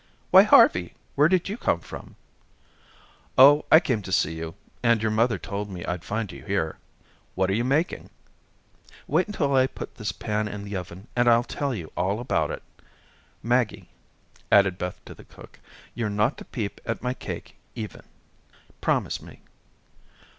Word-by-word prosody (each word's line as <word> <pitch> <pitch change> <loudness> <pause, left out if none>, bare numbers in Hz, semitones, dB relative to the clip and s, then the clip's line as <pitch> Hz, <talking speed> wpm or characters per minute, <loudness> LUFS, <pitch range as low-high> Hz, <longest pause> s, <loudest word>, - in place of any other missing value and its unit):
"Why, - - +10
Harvey, 90 -1 +5 0.2
where 145 +2 +5
did 180 0 +1
you 205 +3 -4
come 85 - +1
from?" - - -10 1.2
"Oh, 145 +3 +8
I 160 - +10
came 125 - -1
to 95 - -8
see 80 -3 +2
you, 80 0 -6 0.3
and 115 -1 +3
your 110 0 0
mother 115 0 +2
told 100 +4 -5
me 90 -3 -7
I'd 90 -1 -3
find 105 -1 -3
you - - -11
here. 95 -6 -2 0.6
What 95 +1 +1
are - - +1
you 115 +4 +1
making?" 150 +7 0 1.0
"Wait 165 +7 +1
until 145 -10 0
I 130 0 +4
put - - -9
this 105 -2 -3
pan 105 -1 -2
in 105 -1 -6
the 100 0 -6
oven, 90 +3 -7
and 120 0 +2
I'll 120 0 +5
tell 140 +1 -3
you 85 -6 -7
all 95 +4 0
about 80 - 0
it. - - -6 0.8
Maggie," 110 -5 0 0.6
added 100 -2 +5
Beth 90 0 -4
to - - -9
the - - -15
cook, - - -16 0.3
"you're 115 -3 -2
not 105 +6 +1
to - - -10
peep 105 -6 -5
at 115 - -4
my 125 0 0
cake - - -8 0.2
even. 105 -4 -6 0.8
Promise - - 0
me." - - -14
105 Hz, 170 wpm, -25 LUFS, 95-125 Hz, 1.2 s, Why